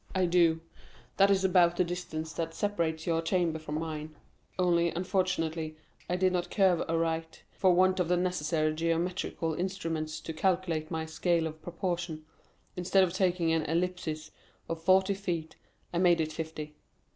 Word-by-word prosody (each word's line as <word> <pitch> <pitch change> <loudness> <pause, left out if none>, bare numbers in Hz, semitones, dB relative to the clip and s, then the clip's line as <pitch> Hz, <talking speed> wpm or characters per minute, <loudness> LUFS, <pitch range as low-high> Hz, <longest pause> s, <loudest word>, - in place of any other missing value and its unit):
"I 185 -1 +3
do; 170 -2 +3 0.6
that 195 0 +6
is 195 -1 +3
about 175 -2 +4
the 180 - +4
distance 170 -2 -4
that 165 -1 -3
separates 165 -6 -1
your 165 -1 +1
chamber 165 -1 0
from 155 -1 -5
mine; 155 -1 -4 0.4
only, 170 -2 +3
unfortunately, 165 -3 -1 0.3
I 180 - +1
did 185 0 +2
not 175 0 -1
curve 190 -4 +3
aright; 165 0 -1
for 185 - +3
want 185 +1 +4
of 180 - +1
the 180 +1 +2
necessary 160 -3 0
geometrical 165 0 -1
instruments 165 -4 -3
to 160 - -6
calculate 170 -2 0
my 160 -1 -2
scale 165 +1 +1
of 155 0 -6
proportion, 175 -2 -3 0.5
instead 190 +1 +3
of 175 -2 0
taking 180 -3 +1
an 165 0 +2
ellipsis 165 -2 -2 0.4
of 165 -1 -4
forty 190 +3 +4
feet, 175 -5 -4 0.4
I 170 - +1
made 175 -2 +4
it 155 -1 -1
fifty. 155 -1 -5
170 Hz, 155 wpm, -30 LUFS, 160-180 Hz, 0.6 s, that